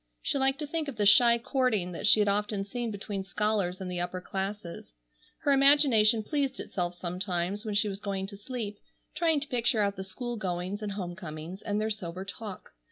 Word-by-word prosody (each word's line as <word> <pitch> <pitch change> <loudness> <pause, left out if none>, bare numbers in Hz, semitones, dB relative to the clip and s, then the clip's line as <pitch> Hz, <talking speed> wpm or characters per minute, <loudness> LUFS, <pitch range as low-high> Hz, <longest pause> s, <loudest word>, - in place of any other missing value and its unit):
She 275 - 0
liked 270 0 +2
to 300 - -3
think 310 +1 -2
of 280 - -5
the 210 -1 +1
shy 235 +3 +7
courting 235 -7 0
that 180 +4 -2
she 215 - +7
had 205 - +2
often 205 0 0
seen 235 +3 -3
between 200 -1 -4
scholars 195 -2 0
in 190 - -5
the 180 -1 -3
upper 180 +1 -2
classes. 190 - -5 0.5
Her 285 - +2
imagination 270 -6 +5
pleased 275 +1 -1
itself 175 -2 -3
sometimes 180 +3 -2
when 210 -2 -2
she 205 +1 +3
was 195 -1 -4
going 195 -2 -2
to 200 +1 -9
sleep, 210 -1 -5 0.3
trying 325 -3 +2
to 295 - -2
picture 235 -4 +2
out 200 0 -1
the 190 - -4
school 240 +5 -5
goings 185 +1 -3
and 205 -1 -3
home 180 -3 -4
comings, 165 +3 -7
and 205 0 -1
their 215 +1 0
sober 185 -3 -4
talk. 200 -1 -8
205 Hz, 205 wpm, -29 LUFS, 190-235 Hz, 0.5 s, shy